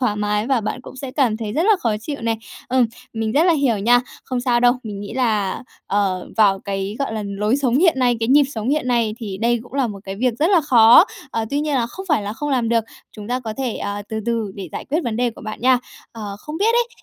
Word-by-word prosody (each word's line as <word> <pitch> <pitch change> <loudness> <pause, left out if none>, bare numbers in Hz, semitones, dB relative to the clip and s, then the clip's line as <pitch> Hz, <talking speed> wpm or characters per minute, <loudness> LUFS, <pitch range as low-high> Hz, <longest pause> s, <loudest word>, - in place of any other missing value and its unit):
thoải 215 -5 +1
mái 210 +1 0
và 265 -4 +2
bạn 215 +4 -4
cũng 260 - -12
sẽ 260 0 -6
cảm 255 -6 +1
thấy 220 -2 -4
rất 310 - +1
là 425 +2 +4
khó 220 -3 0
chịu 285 +5 -5
này. 230 -1 0 0.3
Ừm, 255 -1 +3 0.3
mình 225 -1 -2
rất 300 +6 +4
là 355 - +5
hiểu 275 -9 +1
nha! 240 +4 +4 0.2
Không 255 -1 -2
sao 245 -1 +2
đâu, 245 0 +5
mình 205 -3 -6
nghĩ 205 +1 -7
là, 215 -7 0 0.2
ờ, 195 -2 0
vào 200 -3 +4
cái, 195 +2 -4
gọi 275 - -2
là, 215 -1 -3
lối 210 +4 0
sống 265 -3 +1
hiện 335 -4 +4
nay, 245 -2 +3
cái 225 - 0
nhịp 285 +2 +6
sống 220 +1 -3
hiện 285 -2 0
nay 230 -3 +1
thì 200 -5 -6
đây 235 +1 +1
cũng 245 +2 -15
là 275 -3 +2
một 205 -3 -7
cái 195 0 -6
việc 250 +1 +1
rất 320 +5 +2
là 360 -5 +5
khó. 240 0 +7 0.3
Ờ, 225 -1 -1
tuy 285 +1 0
nhiên 300 -2 -1
là 240 -3 +1
không 380 +11 -9
phải 260 -9 +2
là 205 - -4
không 295 +6 -4
làm 250 -4 +1
được, 230 -1 +2 0.3
chúng 210 -1 -9
ta 250 +1 -1
có 225 -3 -5
thể, 255 -4 -2
ờ, 205 0 -4
từ 220 0 -3
từ 230 -3 -1
để 190 -3 -7
giải - - -5
quyết 310 +4 -1
vấn 225 -2 -2
đề 245 -1 +1
của - - -13
bạn 215 +1 -6
nha. 255 0 +4 0.3
Ờ, 210 -3 -6
không 305 +5 -7
biết 400 - 0
ấy, 480 0 +2
235 Hz, 275 wpm, -20 LUFS, 210-265 Hz, 0.3 s, khó